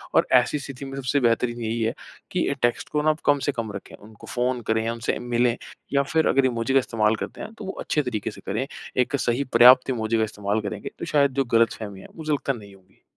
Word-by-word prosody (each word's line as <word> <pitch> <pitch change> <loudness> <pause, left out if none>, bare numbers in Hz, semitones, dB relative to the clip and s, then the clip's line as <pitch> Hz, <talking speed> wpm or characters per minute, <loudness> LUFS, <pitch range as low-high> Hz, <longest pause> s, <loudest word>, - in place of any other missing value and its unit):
और - - +4
ऐसी 135 +4 -1
स्थिति 140 0 -8
में 135 0 -7
सबसे 135 +1 0
बेहतरीन 120 -1 +1
यही 115 +1 -2
है 115 +1 +1 0.4
कि - - 0
अ, - - +1
टेक्स्ट 120 0 0
को 150 - 0
ना 155 - +2
आप 155 - +1
कम 145 -1 +4
से - - +3
कम 115 -5 -4
रखें। 100 - -9
उनको 105 +1 -15
फ़ोन 125 0 -1
करें 110 0 +1
या 115 - 0
उनसे 115 0 -2
मिले 120 0 +1 0.4
या 140 0 +4
फ़िर 160 +3 +1
अगर 135 -1 +3
इमोजी 120 +1 0
का 135 - +6
इस्तेमाल 110 -3 +1
करते - - -6
हैं 220 - -7
तो 215 - -9
वो 190 - -3
अच्छे 150 - 0
तरीके 110 -6 -3
से - - -13
करें। 110 +7 -1 0.3
एक 125 +2 +2
सही 120 +4 +1
पर्याप्त 125 +2 +8
इमोजी 115 -2 0
का 110 - +2
इस्तेमाल 105 0 -2
करेंगे 100 - -5
तो - - -4
शायद 140 -3 +3
जो 135 - 0
गलतफ़हमी 110 -4 +1
है - - -12
मुझे 155 -2 -4
लगता 140 -1 0
नहीं 100 -5 -11
होगी। 95 -1 -26
120 Hz, 245 wpm, -24 LUFS, 110-135 Hz, 0.4 s, पर्याप्त